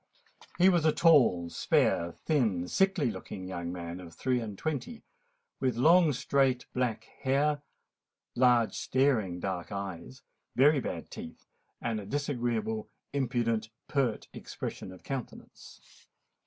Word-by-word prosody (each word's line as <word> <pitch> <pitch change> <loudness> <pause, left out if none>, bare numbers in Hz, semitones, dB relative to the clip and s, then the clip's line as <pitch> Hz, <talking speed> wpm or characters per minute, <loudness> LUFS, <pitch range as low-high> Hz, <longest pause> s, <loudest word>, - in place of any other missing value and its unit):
He 185 - +6
was 175 -4 +4
a 155 - +5
tall, 125 - +4
spare, 85 0 +2
thin, 110 - 0
sickly 190 - +2
looking 95 -3 -7
young 85 -2 -4
man, 85 0 -6
of 85 -3 -11
three 130 -1 0
and 105 -4 -6
twenty; 155 - -4 0.6
with 130 -3 0
long, 165 +4 +6
straight, 135 -1 +1
black 125 -3 -1 0.2
hair, 145 +2 +1 0.7
large 120 -4 +4
staring 120 -10 +1
dark 90 -1 -4
eyes, 100 +5 -6 0.3
very 145 +3 +5
bad - - -5
teeth, - - -9 0.3
and 115 -2 -2
a 100 - -8
disagreeable, 120 -5 -2 0.2
impudent, 120 -5 0 0.2
pert 130 -6 0
expression - - -6
of 95 - -13
countenance. 135 -3 -7
120 Hz, 125 wpm, -30 LUFS, 100-140 Hz, 0.7 s, He